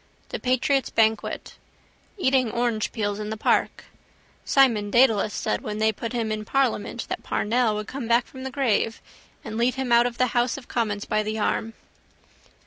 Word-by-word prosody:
The - - -4
patriot's 255 +2 +1
banquet. 220 -1 0 0.6
Eating 260 - +2
orangepeels 220 -3 -1
in 210 0 -4
the 220 - -4
park. - - +1 0.6
Simon 230 -7 +3
Dedalus 225 -3 +4
said - - -2
when 210 -1 -5
they 220 0 +3
put 230 +2 -6
him 230 -3 -2
in 215 0 -2
parliament 240 -2 -1
that - - -4
Parnell 230 0 0
would 210 0 -4
come 265 -3 -5
back 235 +1 +3
from 260 - -11
the 265 - -4
grave 235 -4 0 0.4
and 220 0 -6
lead 245 +2 +2
him 265 -2 -3
out 235 +1 +6
of 240 -1 -6
the 255 - +3
house 240 +1 +1
of 260 - -11
commons 210 -4 -2
by 215 - 0
the 215 +1 -3
arm. 220 +1 -1
230 Hz, 175 wpm, -24 LUFS, 215-255 Hz, 0.6 s, out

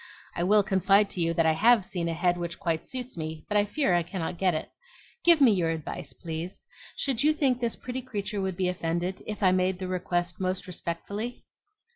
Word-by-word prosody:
I - - -2
will 205 +3 +5
confide 195 +1 +3
to 180 - -2
you 165 0 +2
that 165 - +3
I 160 - +5
HAVE 220 +5 +4
seen 170 -3 -2
a 165 - -2
head 175 +1 +2
which 170 0 -5
quite 165 -3 -1
suits 255 -5 -5
me; 160 -1 -5
but 210 - -3
I 205 0 +4
fear 240 -2 +1
I 175 - +4
cannot 170 0 -4
get 185 -3 +2
it. 155 - -4 0.5
Give 340 -2 +6
me 265 -5 +7
your 175 -5 +1
advice, 155 -3 -4
please. 165 +5 -6 0.3
Should 265 -2 0
you 305 +1 +5
think 270 -5 +1
this 235 -1 0
pretty 255 +1 -5
creature 210 -5 -4
would 190 -2 -2
be 185 -1 +1
offended, 175 +1 -2
if 210 -1 -4
I 185 - +6
made 185 0 +1
the 185 0 -5
request 175 -1 -1
most 185 0 -1
respectfully?" 200 +6 -5
185 Hz, 215 wpm, -28 LUFS, 170-210 Hz, 0.5 s, me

